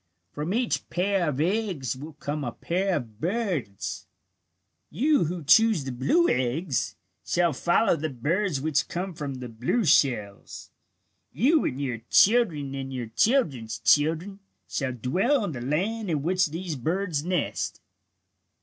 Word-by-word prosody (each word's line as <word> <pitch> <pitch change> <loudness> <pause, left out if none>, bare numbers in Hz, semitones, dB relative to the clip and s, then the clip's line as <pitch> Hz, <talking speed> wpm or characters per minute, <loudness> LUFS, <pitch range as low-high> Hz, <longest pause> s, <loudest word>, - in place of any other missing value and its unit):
From 150 +4 -3
each 235 +3 -1
pair 185 -2 +1
of 140 -2 -3
eggs 175 - -1
will 150 +5 -9
come 145 0 -4
a 120 - -3
pair 185 +2 -1
of 115 -7 -6
birds." 175 - -3 0.8
"You 290 - +2
who 170 +1 -4
choose 220 +2 +5
the 130 - -4
blue 220 - +2
eggs 130 +4 -1 0.3
shall 175 -2 +1
follow 175 - +2
the 155 0 -3
birds 155 - -1
which 150 +1 0
come 180 +2 -4
from 145 -4 -5
the 125 -1 -6
blue 125 - -1
shells. 105 -10 +1 0.6
You 275 - +3
and 130 - -2
your 130 -5 -2
children 180 - +4
and 135 -1 -5
your 125 -4 -5
children's 130 - +1
children 160 - +2 0.3
shall 135 -3 -2
dwell 190 - +1
in 175 - -3
the 125 -5 -6
land 190 - -1
in 150 -4 -1
which 185 +2 +2
these 165 +1 -5
birds 160 +3 -1
nest. 180 -2 -2
155 Hz, 145 wpm, -26 LUFS, 135-195 Hz, 0.8 s, choose